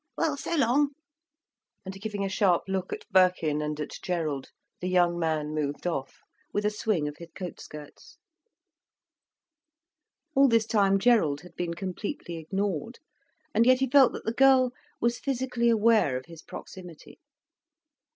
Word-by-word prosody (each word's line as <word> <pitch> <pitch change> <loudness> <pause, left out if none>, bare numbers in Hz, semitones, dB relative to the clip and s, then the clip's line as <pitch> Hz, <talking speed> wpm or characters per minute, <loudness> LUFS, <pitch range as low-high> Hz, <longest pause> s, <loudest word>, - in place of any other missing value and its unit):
"Well, 320 -3 +1
so 310 +4 -3
long." 280 +1 +2 0.9
And 195 +1 -8
giving 205 -2 -3
a - - 0
sharp 190 -2 +2
look 190 -1 -2
at - - -6
Birkin 180 -5 +3
and 150 0 -3
at 150 - -4
Gerald, 155 -7 -2 0.3
the 180 - -3
young 175 -1 +2
man 155 -2 -1
moved 145 0 -3
off, 140 -7 -3 0.3
with 205 0 -1
a 210 - +2
swing 210 -7 -1
of 150 - -7
his 170 - -10
coat 180 -3 -7
skirts. 150 -1 -12 2.2
All 275 0 +6
this 230 -3 +3
time 200 -3 +3
Gerald 195 -10 +3
had 180 0 -14
been 170 -1 -3
completely 185 - -5
ignored. 190 - -3 0.6
And 230 - +4
yet 255 0 +6
he 265 - +1
felt 265 -1 +6
that - - -7
the 225 - -1
girl 260 0 +5 0.3
was 235 +1 0
physically 250 -3 0
aware 220 - +3
of 130 - -8
his 165 -1 -12
proximity. 180 -4 -11
190 Hz, 150 wpm, -27 LUFS, 165-235 Hz, 2.2 s, All